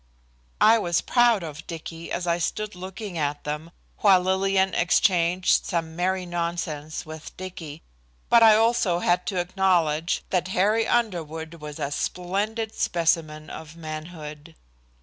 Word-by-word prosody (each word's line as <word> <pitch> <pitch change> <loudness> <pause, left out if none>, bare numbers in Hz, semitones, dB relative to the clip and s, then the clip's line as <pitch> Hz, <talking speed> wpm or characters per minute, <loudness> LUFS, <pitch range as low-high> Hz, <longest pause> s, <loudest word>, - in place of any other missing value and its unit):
I 225 +1 +6
was 175 -4 +1
proud 240 -5 +3
of 155 -1 -8
Dicky 165 0 -7
as 175 - -2
I 170 0 +1
stood 210 +5 -2
looking 185 0 -6
at 145 -1 -2
them, 150 +2 -4 0.3
while 195 -3 +6
Lillian 190 +1 +1
exchanged 180 0 +3
some 165 -2 -3
merry 185 +1 0
nonsense 170 -3 -3
with 155 0 -10
Dicky, 165 -5 -8 0.4
but 235 - +6
I 220 -1 +8
also 220 -5 +3
had 180 0 +1
to 185 - -1
acknowledge 175 -3 +1
that 180 -1 +1
Harry 215 +4 +3
Underwood 165 -8 -1
was 150 -1 -7
a 140 - -3
splendid 205 +8 -2
specimen 160 -2 0
of 160 0 -9
manhood. 155 -1 -8
175 Hz, 135 wpm, -25 LUFS, 160-190 Hz, 0.4 s, I